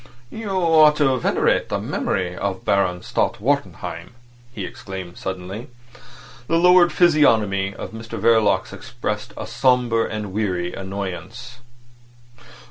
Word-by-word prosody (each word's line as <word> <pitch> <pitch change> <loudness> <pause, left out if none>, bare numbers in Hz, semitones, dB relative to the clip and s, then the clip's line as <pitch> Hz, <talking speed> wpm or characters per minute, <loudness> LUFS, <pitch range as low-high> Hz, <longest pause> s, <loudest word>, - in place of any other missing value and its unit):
"You 220 -2 -6
ought 165 -5 +5
to 135 -3 +2
venerate - - +1
the - - -1
memory 90 -1 -2
of 95 0 -4
Baron 90 -3 +1
Stott - - -1
Wartenheim," 120 - -3 0.4
he 105 -6 -5
exclaimed 95 -3 -8
suddenly. 95 +4 -6 0.8
The 165 - +2
lowered 180 0 +6
physiognomy 110 - +3
of - - -7
Mr 115 0 -7
Verloc 110 -1 +2
expressed - - -5
a - - -5
sombre 125 -3 +1
and 105 -3 -5
weary 90 -4 -2
annoyance. 100 +6 -6
110 Hz, 120 wpm, -21 LUFS, 95-130 Hz, 0.8 s, lowered